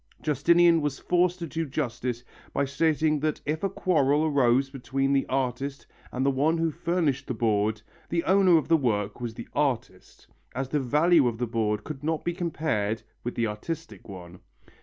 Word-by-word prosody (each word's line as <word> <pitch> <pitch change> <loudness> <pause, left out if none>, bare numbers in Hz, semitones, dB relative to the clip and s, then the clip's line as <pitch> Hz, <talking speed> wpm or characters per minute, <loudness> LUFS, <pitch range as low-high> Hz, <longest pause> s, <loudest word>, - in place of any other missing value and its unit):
Justinian 170 +3 +4
was 145 -2 -2
forced 180 0 +1
to 170 - -5
do 165 +1 -3
justice 125 -3 -3 0.3
by 140 - +1
stating 155 +2 +1
that 155 +1 -1
if 155 +2 -2
a 195 - +1
quarrel 150 -5 +2
arose 135 -3 +3
between 135 +1 -1
the 135 - +1
artist 135 +1 -2 0.3
and 130 +1 -1
the 140 - +4
one 150 +5 +1
who 165 0 0
furnished 165 -4 -1
the 125 - -3
board 110 -1 0 0.3
the 170 0 0
owner 190 -2 +5
of 155 - -1
the 165 - +4
work 105 -6 -1
was 115 -2 -4
the 115 - -8
artist, 135 -6 -3 0.3
as 130 0 -3
the 150 - 0
value 150 +3 +3
of 115 -2 -2
the 120 - -1
board 110 -2 -1
could 150 -2 -8
not 160 0 -2
be 175 - 0
compared 150 - -2 0.2
with 120 - -4
the 115 - +1
artistic 155 +8 -6
one. 90 -2 -10
140 Hz, 180 wpm, -26 LUFS, 120-160 Hz, 0.3 s, owner